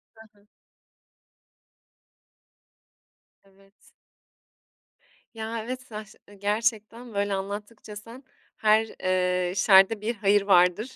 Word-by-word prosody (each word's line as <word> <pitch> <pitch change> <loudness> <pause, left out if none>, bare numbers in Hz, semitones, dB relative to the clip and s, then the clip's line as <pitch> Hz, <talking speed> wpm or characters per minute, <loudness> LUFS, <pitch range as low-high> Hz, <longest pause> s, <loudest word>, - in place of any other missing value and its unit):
Hı 220 0 -16
hı. 205 - -30 3.0
Evet 195 0 -26 1.4
Ya, 225 0 -5
evet 255 +2 -6
saç 215 -4 -10
ııı, 205 - -16
gerçekten 220 +2 -2
böyle 200 0 -1
anlattıkça 205 +2 -6
sen 230 +5 -11 0.3
her, 220 +1 +3 0.2
eee, 180 -1 0
şerde 195 +2 +5
bir 230 +3 -2
hayır 205 0 +2
vardır 195 +4 +2
210 Hz, 95 wpm, -26 LUFS, 195-225 Hz, 3.0 s, şerde